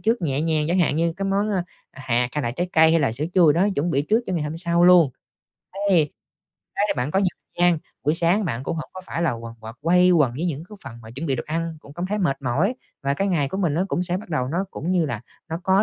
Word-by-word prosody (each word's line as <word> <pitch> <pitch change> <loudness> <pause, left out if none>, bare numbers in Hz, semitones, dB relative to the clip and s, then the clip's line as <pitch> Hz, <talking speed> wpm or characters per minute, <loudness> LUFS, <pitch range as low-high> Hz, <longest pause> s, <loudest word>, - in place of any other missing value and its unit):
trước 225 -3 +1
nhẹ 140 -2 0
nhàng, 155 -2 +1
chẳng 180 +2 +2
hạn 155 -4 +2
như 165 0 +1
cái 195 - -3
món, 200 +2 +1
a, 190 -4 0 0.3
à, 135 - -12
hạt 120 0 +2
hay 150 - -1
là 120 - -1
trái 175 +9 -3
cây 160 0 +6
hay 165 - +3
là 135 -6 +1
sữa 140 +6 -3
chua 170 -5 +6
đó, 180 +6 +2
chuẩn 165 +5 0
bị 140 -2 +1
trước 220 +9 +2
cho - - -3
ngày 165 -4 0
hôm 150 +2 -4
sau 170 0 +2
luôn. 175 -6 +7 0.8
Thế, 165 -6 +4 0.7
thế 205 +1 +2
bạn 125 +4 -1
có 190 - +1
nhiều 190 - +3 0.3
gian, 175 -2 +4 0.3
buổi 150 +2 +2
sáng 175 +5 +2
bạn 130 -7 -3
cũng 165 - -3
hổng 155 - -6
có 185 - -8
phải 170 - -3
là 165 - +2
quần 115 0 -7
quật, 110 +1 -9
quay 180 +3 +4
quần 150 -8 +4
với 155 - -3
những 155 -2 -3
cái 210 - -11
phần 130 - -8
mà 110 - -11
chuẩn 135 +7 -5
bị 135 - +1
đồ - - -3
ăn, 165 +1 -3
cũng 140 - -14
cảm 175 +3 -3
thấy 210 +2 -2
mệt 140 -7 0
mỏi 155 - +1 0.3
và 140 0 0
cái 195 +5 0
ngày 150 -7 +1
của 190 - -4
mình 170 -7 +1
nó 180 +4 +1
cũng 180 - 0
sẽ 180 0 -1
bắt 200 - -8
đầu 130 -4 -1
nó 170 +5 -1
cũng 170 - -4
như 170 -4 +2
là 120 -6 -3 0.3
nó 165 +2 -4
có 190 +2 +4
165 Hz, 290 wpm, -23 LUFS, 140-180 Hz, 0.8 s, luôn